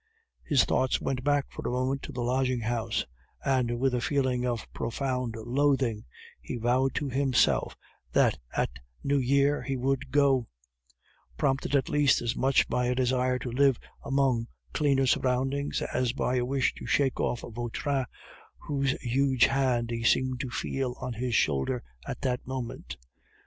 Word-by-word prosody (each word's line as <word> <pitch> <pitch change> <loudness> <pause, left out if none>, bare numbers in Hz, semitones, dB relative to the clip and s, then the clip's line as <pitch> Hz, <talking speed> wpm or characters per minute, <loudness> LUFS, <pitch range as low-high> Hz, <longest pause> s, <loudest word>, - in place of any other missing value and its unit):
His 145 -6 +4
thoughts 130 0 +1
went 130 -2 -2
back 145 -1 +2
for - - -7
a - - -2
moment 130 +2 -1
to - - -7
the 125 - -3
lodging 130 0 +1
house, 115 -1 -1 0.4
and 125 -3 +1
with 135 0 +2
a 125 - 0
feeling 130 -3 0
of 120 -2 -2
profound 125 0 -2
loathing, 125 -1 0 0.4
he - - -5
vowed 125 +3 +1
to 145 - -1
himself 135 -1 +2 0.3
that - - +3 0.2
at - - -1 0.2
New 140 0 +2
Year 140 +3 +2
he 135 -1 -3
would 135 +1 -1
go; 135 -4 +3 0.9
prompted 135 +1 0
at 135 - +2
least 145 -2 +3
as 120 -1 -2
much 135 0 +3
by 125 0 0
a 125 - +1
desire 125 0 +1
to 125 -1 -5
live 135 0 +4 0.3
among 135 -4 +1 0.3
cleaner 140 -3 +2
surroundings 135 +3 0
as 125 -1 -1
by 130 -2 0
a 120 - +1
wish 135 0 +1
to - - -8
shake 135 -3 +1
off 120 - 0
Vautrin, 120 +4 -2 0.5
whose 140 -2 -1
huge 130 0 +3
hand 130 -3 +1
he 115 0 -3
seemed 130 +2 +2
to 130 -2 -3
feel 130 0 -2
on 125 -1 -4
his 120 +1 -2
shoulder 70 -8 +1 0.2
at - - -5
that 125 -2 -2
moment. 130 -2 -5
130 Hz, 160 wpm, -28 LUFS, 120-135 Hz, 0.9 s, His